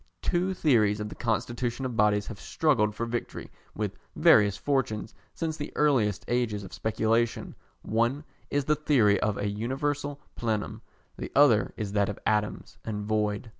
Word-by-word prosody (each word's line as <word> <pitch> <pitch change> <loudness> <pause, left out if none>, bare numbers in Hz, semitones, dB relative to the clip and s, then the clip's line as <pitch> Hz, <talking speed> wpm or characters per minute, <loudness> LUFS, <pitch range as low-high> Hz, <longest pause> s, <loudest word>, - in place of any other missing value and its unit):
Two 185 +1 0
theories 110 - +3
of 105 0 -4
the - - -7
constitution 120 +2 -2
of 125 -2 -3
bodies 105 -1 +3
have 100 - -8
struggled 110 -10 +1
for 115 - -2
victory 120 0 -5 0.2
with 105 -2 -3 0.2
various 100 -1 +5
fortunes 120 -6 -1 0.2
since 160 -2 -3
the 145 - -5
earliest 115 -10 +2
ages 120 -4 0
of 95 - -10
speculation: 115 +1 0 0.3
one 120 +6 0 0.3
is 145 -1 0
the 150 - +3
theory 125 -10 +3
of 105 -2 0
a 105 - -1
universal 140 +7 -2 0.2
plenum, 110 -1 -2 0.4
the - - -5
other 135 -7 +5
is 105 -2 -3
that 100 -1 +1
of 105 - -5
atoms 105 -1 -1
and 105 -2 -4
void. 105 +1 -1
110 Hz, 160 wpm, -28 LUFS, 105-135 Hz, 0.4 s, various